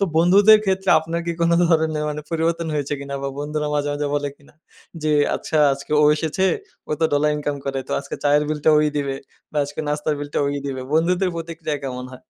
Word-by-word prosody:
তো 200 - +4
বন্ধুদের 200 +6 +6
ক্ষেত্রে 190 0 0
আপনার 165 +2 -3
কি 170 - 0
কোন 170 - +3 0.2
ধরনের 155 -2 +1
মানে 150 0 -4
পরিবর্তন 165 0 0
হয়েছে 145 0 -1
কিনা 140 0 -6
বা 140 - -2
বন্ধুরা 150 +1 -2
মাঝে, 145 0 0
মাঝে 145 0 -2
বলে 145 0 -1
কিনা? 145 - -23 0.5
যে 155 - +1 0.3
আচ্ছা 155 - -2
আজকে 140 +2 -6
ও - - +6
এসেছে 160 +5 0 0.4
ও - - +1
তো 160 - +3
ডলার 150 +1 +2
ইনকাম 145 -1 -2
করে। 135 -1 -1
তো - - -3
আজকে - - -7
চায়ের 145 +1 +4
বিলটা 155 0 +2
ওই 150 - +3
দিবে 140 -2 -1 0.4
বা 150 - -1
আজকে 145 +2 -6
নাস্তার 150 +1 -1
বিলটা 145 0 -3
ওই 145 0 -1
দিবে। 135 -2 -4
বন্ধুদের 180 +4 +2
প্রতিক্রিয়া 165 -2 -4
কেমন 125 -1 -5
হয়? 130 - -10
150 Hz, 210 wpm, -21 LUFS, 145-165 Hz, 0.5 s, বন্ধুদের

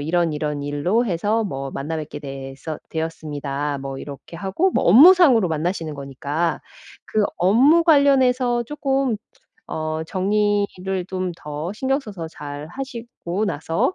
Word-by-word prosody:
이런 165 +2 +1
이런 150 -1 -2
일로 175 +12 +1
해서 205 +5 0
뭐 135 -8 -4
만나 150 +4 -3
뵙게 150 -1 -6
되서 135 +2 -7
되었습니다." 145 -3 -3
뭐 135 0 -5
이렇게 145 +4 -9
하고 195 - 0
뭐 - - +1
업무상으로 265 - +7
만나시는 160 0 -2
거니까 140 +4 -2 0.4
그 215 -1 +1
업무 260 - +5
관련해서 260 -5 +4
쪼끔 275 -3 0 0.5
어 155 0 -2
정리를 195 -1 0
좀 185 -1 -2
더 150 +4 -5
신경 270 +4 0
써서 195 - -7
잘 145 -2 -8
하시고 235 -6 -5
나서 190 - -1
175 Hz, 275 characters per minute, -22 LUFS, 150-235 Hz, 0.5 s, 업무상으로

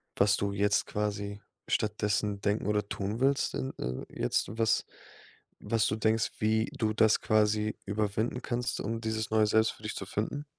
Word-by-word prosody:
was 100 +1 +4
du 100 0 -1
jetzt 100 0 +2
quasi 100 -1 -3 0.3
stattdessen 105 -1 0
denken 105 +1 0
oder 105 -1 0
tun 105 +3 -3
willst 135 +1 +2
in 65 +1 -3
äh, 65 +1 -3
jetzt - - 0
was 110 -1 +2 0.7
was 115 -3 +1
du 105 - 0
denkst, 110 0 +1
wie 110 +1 +2
du 110 -2 +1
das 110 0 +4
quasi 105 0 +2
überwinden 105 +4 -1
kannst, 120 -1 -2
um 115 +2 -3
dieses 110 -1 -2
neue 110 -1 +4
Selbst 110 +1 +3
für - - -16
dich 105 - -3
zu 100 - -5
finden? 110 +9 -3
105 Hz, 170 wpm, -30 LUFS, 100-110 Hz, 0.7 s, was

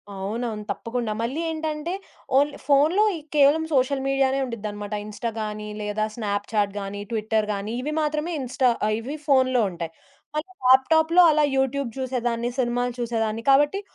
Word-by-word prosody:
అవునవును. 215 +2 -3
తప్పకుండా 230 -2 -3
మళ్ళీ 265 +8 -2
ఏంటంటే 315 +2 -3 0.4
ఓన్లీ 285 +1 +2
ఫోనులో 305 +9 +4 0.3
కేవలం 290 +3 +5
సోషల్ 265 +1 +2
మీడియానే 270 0 +2
ఉం‌డి‌‌ద్దన్నమాట. 210 -3 -5
ఇన్‌స్టా‌‌గాని, 215 -1 -4
లేదా 210 +1 -1
స్నాప్‌చాట్‌గాని, 205 -2 -2
ట్విట్టర్‌గాని 215 -1 -1
ఇవి 300 +3 -3
మాత్రమే 305 +3 -1
ఇన్‌స్టా 255 0 +1 0.2
ఆహ్, 215 - +1
ఇవి 275 +7 -5
ఫోనులో 260 -3 +4
ఉంటాయి. 170 -1 -5 0.5
అలా 330 +5 -4
ల్యాప్‌టాప్‌లో 320 +7 +5
అలా 300 0 +3
యూట్యూబ్ 265 -1 0
చూసేదాన్ని, 240 -2 -1
సినిమాలు 245 0 0
చూసేదాన్ని, 225 -1 -1
కాబట్టి 295 +8 +3
245 Hz, 125 wpm, -24 LUFS, 215-280 Hz, 0.5 s, కేవలం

